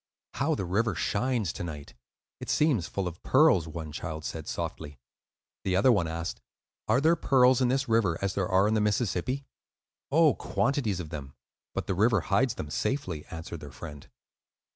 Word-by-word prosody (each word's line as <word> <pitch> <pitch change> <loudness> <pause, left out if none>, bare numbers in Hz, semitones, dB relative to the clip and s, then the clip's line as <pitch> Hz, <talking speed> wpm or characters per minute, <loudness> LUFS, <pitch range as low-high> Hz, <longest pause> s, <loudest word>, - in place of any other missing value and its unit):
"How - - +1
the 95 - -3
river 100 +3 0
shines 110 +2 0
to - - -5
night! 75 -4 -7 0.5
it - - -7
seems 135 - +2
full 100 -2 -2
of 85 -1 -7
pearls," 85 -4 +4
one 80 -1 -6
child 80 0 -5
said, 80 -2 -5
softly. 75 -1 -5 0.7
The 95 -1 0
other 105 +7 +5
one 100 -8 +2
asked, 85 +1 -4 0.5
"Are 110 +4 +4
there 160 +4 +4
pearls 130 -5 +4
in 125 - +4
this 135 +3 +1
river 110 -8 +2
as 100 -1 -1
there 95 -2 -1
are 95 +2 +4
in 110 - +1
the 110 - +2
Mississippi?" 110 +5 0 0.7
"Oh, 155 0 +5
quantities 125 -8 -1
of 80 -4 -6
them; 70 -3 -7 0.4
but - - -2
the - - -1
river 105 +1 +3
hides 115 +4 +1
them 75 - -6
safely," 90 - -2
answered 80 0 -7
their 75 - -9
friend. 70 +2 -10
100 Hz, 180 wpm, -28 LUFS, 80-125 Hz, 0.7 s, other